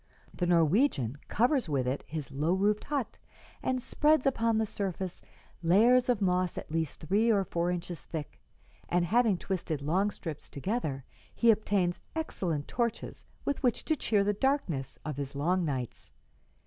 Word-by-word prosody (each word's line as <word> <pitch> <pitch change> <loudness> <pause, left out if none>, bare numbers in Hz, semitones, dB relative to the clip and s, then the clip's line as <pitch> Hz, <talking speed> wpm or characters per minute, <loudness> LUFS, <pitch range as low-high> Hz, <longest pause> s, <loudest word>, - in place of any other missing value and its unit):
The 175 - -1
Norwegian 165 - +2
covers 245 - +2
with 135 -4 +1
it 130 +3 -1
his 155 -3 -5
low 150 +5 +1
roofed 205 +2 +1
hut 280 -6 -3 0.4
and 255 0 0
spreads 300 +3 +2
upon 230 -4 +2
the 220 - +2
surface 190 -3 -4 0.4
layers 235 +9 +5
of 225 -5 +2
moss 180 -1 +1
at - - -6
least 160 -2 -2
three 205 +8 +2
or 200 -3 +3
four 170 -1 -1
inches 175 -1 -4
thick, 155 -3 -7 0.5
and, 175 0 +2
having 220 +1 +3
twisted 170 -5 -3
long 180 +8 +1
strips 160 -7 -7
together, 145 - -3 0.3
he 235 -1 +6
obtains 200 -5 0
excellent 175 - -2
torches 235 -2 -3 0.2
with 285 - -1
which 250 -4 +1
to 315 - +2
cheer 210 -7 +2
the 205 +1 +1
darkness 200 - -1
of 150 -3 -4
his 140 -1 -5
long 175 +6 +1
nights. 130 -5 -4
185 Hz, 160 wpm, -30 LUFS, 160-230 Hz, 0.5 s, he